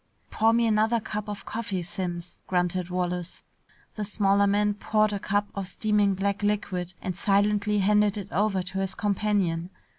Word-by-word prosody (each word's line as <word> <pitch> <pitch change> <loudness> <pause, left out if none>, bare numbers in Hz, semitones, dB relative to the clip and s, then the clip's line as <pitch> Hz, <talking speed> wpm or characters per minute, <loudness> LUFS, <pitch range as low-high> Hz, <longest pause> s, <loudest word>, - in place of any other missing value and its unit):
"Pour 225 +1 +3
me 235 0 +3
another 220 +1 +3
cup 210 -1 -5
of 205 - -6
coffee, 205 -5 -3
Simms," 175 0 -5
grunted 180 0 0
Wallace. 180 -1 -3 0.5
The 215 - -4
smaller 200 -1 +2
man 205 +1 +2
poured 215 +1 +1
a 200 - -2
cup 205 +1 0
of 195 -2 -4
steaming 210 -1 +1
black 200 +1 -1
liquid 190 -4 -1
and 185 -2 -3
silently 205 +2 +2
handed 210 +1 +3
it 200 -1 -6
over 195 -1 +1
to 185 +1 -4
his 195 0 -2
companion. 200 -5 0
200 Hz, 160 wpm, -27 LUFS, 185-210 Hz, 0.5 s, Pour